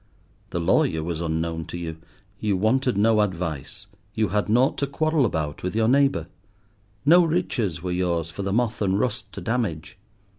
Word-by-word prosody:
The 85 - -2
lawyer 80 -1 +2
was 85 0 -3
unknown 80 0 -2
to - - -6
you; 80 -2 -5 0.4
you 105 -3 0
wanted 120 +3 +1
no 110 +1 +4
advice; 90 0 -3 0.3
you 110 -3 +1
had 105 +2 0
nought 125 +5 +3
to 140 - 0
quarrel 155 -1 +1
about 75 -6 -3
with 90 +3 -3
your 110 0 +2
neighbour. 135 - +3 0.8
No 175 +4 +7
riches 125 - -1
were 90 - -2
yours 85 -2 -1
for 100 - -6
the 100 0 -2
moth 115 +1 0
and 95 -1 +1
rust 120 +1 -2
to - - -7
damage. 100 -9 -2
100 Hz, 175 wpm, -24 LUFS, 85-120 Hz, 0.8 s, No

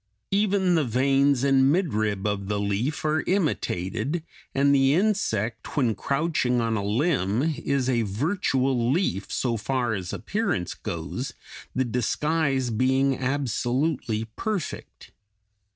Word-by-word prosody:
Even 195 -2 +2
the 160 -3 +3
veins 135 +2 +2
and 135 -1 +4
midrib 110 - 0
of 100 -2 -1
the 105 0 -1
leaf 105 +10 -1
are 155 +1 +2
imitated, 145 - -1 0.3
and 140 +1 +4
the 135 +1 +4
insect, 165 - -1
when 125 -6 +3
crouching 140 -2 0
on 115 -1 0
a 100 - -1
limb, 115 - +1 0.2
is 140 -2 0
a 120 -3 +2
virtual 130 - 0
leaf, 140 - -1
so 120 -3 0
far 120 +2 -1
as 95 -4 -4
appearance 175 - -2
goes, 85 +11 -5 0.4
the 130 - +1
disguise 135 +2 0
being 130 +4 +2
absolutely 130 -2 -1
perfect. 210 -7 -4
130 Hz, 120 wpm, -25 LUFS, 110-150 Hz, 0.4 s, and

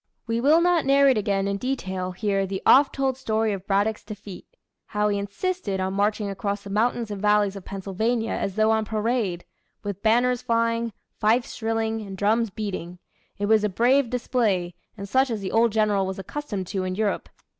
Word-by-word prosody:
We 230 0 -1
will 305 +6 +5
not 350 -2 +3
narrate 275 -3 +4
again 200 -2 0
in 200 0 -1
detail 190 -7 -3
here 195 +1 -1
the 190 0 -4
oft 275 +1 +6
told 270 -2 0
story 220 -4 0
of 195 -1 -7
Braddock's 205 +2 +1
Defeat 205 -3 -9 0.4
how 210 0 0
he 200 -1 0
insisted 200 - -3
on 190 0 -1
marching 205 +1 0
across 200 +1 -3
the 200 - -8
mountains 230 +1 0
and 200 -2 -5
valleys 210 -1 +3
of 195 - -9
Pennsylvania, 220 +4 -2
as 195 - -2
though 220 0 +3
on 220 0 +2
parade 215 -4 -1 0.4
with 200 -1 -5
banners 245 +2 +3
flying, 230 0 0 0.3
fifes 225 +3 +2
shrilling, 225 -1 -1
and 195 -2 -8
drums 220 +3 +2
beating. 190 -4 -5 0.4
It 205 - -1
was 215 0 +4
a 210 - +2
brave 245 +6 +3
display, 220 -8 0 0.2
and 200 0 -6
such 260 +6 +2
as 225 -3 -2
the 190 - -4
old 230 0 +3
General 205 -3 +2
was 190 - -4
accustomed 200 -1 -5
to, 190 -2 -2
in 185 0 -2
Europe. 210 0 -1
215 Hz, 190 wpm, -24 LUFS, 195-230 Hz, 0.4 s, oft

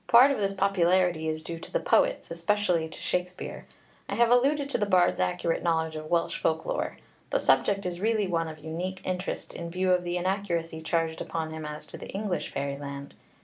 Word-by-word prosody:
Part 255 +4 +8
of 275 - -1
this 195 -1 0
popularity 180 -4 +2
is 155 0 -3
due 165 0 -5
to - - -10
the - - +1
poets, - - +2
especially 170 -1 +1
to - - -10
Shakspeare. 180 0 -3 0.4
I - - -1
have 235 0 +4
alluded 280 +4 +4
to - - 0
the 205 - +1
bard's 185 -3 +4
accurate 130 - 0
knowledge 160 -1 0
of 155 0 -6
Welsh 170 -1 +1
folk 160 0 0
lore; - - -2 0.3
the - - +2
subject 200 - +3
is 175 0 -3
really 220 -1 +2
one 165 -3 0
of 155 -1 -7
unique 170 +5 -4
interest, 185 +1 -3
in 170 0 -5
view 185 +2 +1
of 180 -1 +3
the 175 0 -1
inaccuracy 175 -3 -1
charged 160 0 0
upon 160 -1 -3
him 160 -1 -5
as 150 0 -7
to - - -10
the - - -8
English 195 -2 -2
fairyland. 140 0 -4
175 Hz, 200 wpm, -28 LUFS, 160-195 Hz, 0.4 s, Part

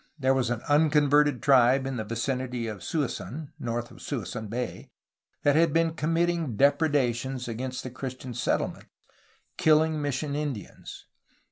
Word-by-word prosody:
There 135 -2 +2
was 130 -3 +1
an 120 -2 -2
unconverted 145 -2 +3
tribe 130 -1 +5
in 135 -1 -3
the 110 - -2
vicinity 125 +2 -2
of 110 -3 -5
Suisun, 150 - -3
north 120 -2 -3
of - - -14
Suisun 115 -4 -4
Bay, 125 +3 -4 0.5
that 145 -1 +4
had 165 -1 +4
been 165 0 +2
committing 165 -4 0
depredations 135 -3 +1
against 125 +2 -4
the 130 - -6
Christian 130 0 -6
settlements, - - -1 0.7
kilUng 155 0 +4
mis 145 -3 -1
sion 140 +1 -3
Indians. 145 -8 -6
135 Hz, 140 wpm, -27 LUFS, 120-150 Hz, 0.7 s, tribe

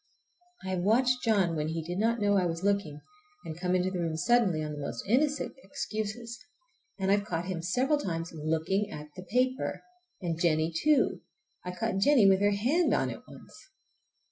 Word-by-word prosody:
I - - -4
have 185 -1 -1
watched 250 +6 +2
John 195 -7 +2
when 150 -1 -1
he 160 0 -3
did 175 +3 -4
not 230 +2 +1
know 205 -1 +2
I 185 -2 +3
was 165 +1 -4
looking, 200 -7 0 0.4
and 160 - -5
come 180 0 0
into 185 +1 +1
the 185 - -3
room 165 -2 -2
suddenly 190 -4 +2
on 150 - -4
the 150 - -6
most 140 - -5
innocent 285 +7 +1
excuses, 230 -3 -5 0.5
and 190 -1 0
I've 205 0 +3
caught 175 -4 -3
him 180 -3 -3
several 255 - +1
times 165 - -3
looking 160 +6 -1
at 150 -6 -8
the 185 - -7
paper! 255 +7 -1 0.4
And 170 -3 -3
Jennie 160 -1 +2
too. 300 - +2 0.4
I 180 - -5
caught 225 -1 -1
Jennie 240 -1 +5
with 190 0 +4
her 205 - +4
hand 250 - +2
on - - 0
it - - -8
once. - - -14
190 Hz, 190 wpm, -29 LUFS, 165-230 Hz, 0.5 s, Jennie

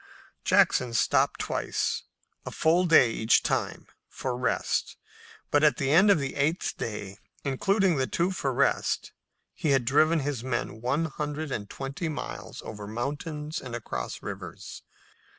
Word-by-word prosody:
Jackson 125 -2 +3
stopped - - +2
twice, - - -1 0.4
a - - -5
full 170 +3 +2
day 130 -8 +6
each 110 +1 +3
time, - - -1 0.2
for 130 -2 -3
rest, 125 -1 -1 0.5
but 145 +1 +4
at 150 - +5
the 135 0 0
end 190 +7 +6
of 200 - +6
the 140 -2 -3
eighth 150 +5 0
day, 105 -3 -5 0.2
including 185 +6 +2
the 130 -1 +1
two 175 +3 0
for 140 -7 -1
rest, 125 - +1 0.4
he 155 - -2
had 135 -3 +3
driven 155 +5 +4
his 135 -4 -3
men 120 -3 -3
one 140 +7 +1
hundred 150 0 -4
and 100 -5 -4
twenty 140 +5 -4
miles 155 - -6
over 105 -2 -7
mountains 150 - -4
and 125 -2 -6
across 65 - -5
rivers. - - -7
140 Hz, 150 wpm, -27 LUFS, 120-155 Hz, 0.5 s, day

